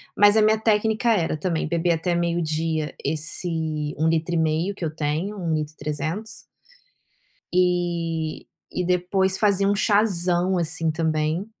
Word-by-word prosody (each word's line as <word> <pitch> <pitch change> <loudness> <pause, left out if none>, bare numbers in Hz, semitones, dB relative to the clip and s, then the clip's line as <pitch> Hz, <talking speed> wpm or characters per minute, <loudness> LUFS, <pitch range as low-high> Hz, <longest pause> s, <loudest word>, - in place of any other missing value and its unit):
mas 205 +1 +6
a - - +5
minha 215 0 +3
técnica 220 +1 +1
era 170 -7 +1
também 160 0 -2
beber 170 +1 0
até 170 +2 -1
meio-dia 165 -2 -1
esse 155 0 -1
1 160 +2 +1
litro 165 +1 0
e - - +1
meio 160 +5 0
que 175 - -4
eu 155 - -2
tenho, 160 +7 -3
1 165 -3 -1
litro 155 0 -3
e - - -37
300 155 +9 -3 1.2
e 170 -3 -1 0.3
e 180 - 0
depois 185 +2 +1
fazer 200 -2 +3
um 205 - +2
chazão 185 -4 +2
assim 165 -1 +1
também, 160 +2 -1
170 Hz, 150 wpm, -23 LUFS, 160-190 Hz, 1.2 s, mas